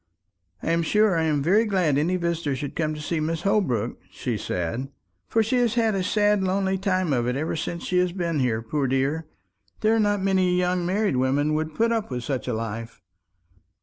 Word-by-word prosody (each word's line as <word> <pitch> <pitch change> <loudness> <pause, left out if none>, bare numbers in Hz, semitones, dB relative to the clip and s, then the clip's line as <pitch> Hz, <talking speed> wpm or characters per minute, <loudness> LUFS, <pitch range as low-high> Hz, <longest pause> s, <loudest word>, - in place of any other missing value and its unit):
"I - - 0
am 170 0 +2
sure 210 +3 +3
I'm 155 -3 +1
very 200 +8 +4
glad 185 -9 +1
any 160 +6 +1
visitor 170 -5 -1
should 140 +1 -5
come 155 -1 -1
to - - -7
see 155 +2 -2
Mrs. 160 +1 -2
Holbrook," 125 - 0
she 115 +5 -3
said; 100 +7 -3 0.4
"for 225 - +2
she 235 +4 0
has 240 -2 +2
had 225 -2 +2
a 195 - 0
sad 205 +1 +2
lonely 190 0 0
time 185 -5 +1
of 120 -2 0
it 125 - 0
ever 155 +4 -2
since 170 +2 -4
she 180 - +1
has 180 -1 +2
been 170 -4 -2
here, 115 -4 0
poor 140 +4 -1
dear. 135 +5 0 0.5
There 220 +1 +3
are - - +2
not 205 -2 +1
many 185 -2 +2
young 180 -1 +1
married 195 -6 +1
women 140 +4 +1
would 155 0 -2
put 230 +1 +2
up 225 -2 -1
with 125 -2 -4
such 130 0 -3
a 125 - -1
life." 115 +1 -5
165 Hz, 210 wpm, -25 LUFS, 135-195 Hz, 0.5 s, very